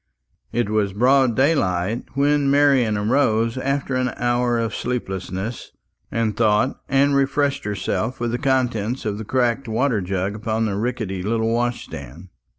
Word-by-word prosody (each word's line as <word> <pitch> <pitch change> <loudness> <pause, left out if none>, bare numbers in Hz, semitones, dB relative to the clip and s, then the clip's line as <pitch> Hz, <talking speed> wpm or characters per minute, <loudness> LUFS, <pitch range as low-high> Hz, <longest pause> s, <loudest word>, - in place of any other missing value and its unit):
It 120 -2 0
was 105 -3 +1
broad 125 +2 +3
daylight 115 - +1
when 145 0 +2
Marian 135 -6 +3
rose 115 -4 +2
after 135 +1 -2
an 130 0 +1
hour 120 0 +1
of 115 -2 -1
sleeplessness 100 -2 -4 0.4
and 115 -2 0
thought, 110 +3 +1
and 140 +1 +3
refreshed 140 +1 +1
herself 105 +4 -2
with 120 -1 -1
the 120 - -2
contents 125 -3 0
of 105 -1 -2
the 110 - -6
cracked 125 +2 0
water 115 0 +1
jug 95 +1 -2
upon 110 +1 -1
the 100 -3 -1
rickety 105 -4 -2
little 110 +3 0
wash 120 +1 -1
stand. 70 +8 -10
120 Hz, 150 wpm, -22 LUFS, 105-130 Hz, 0.4 s, broad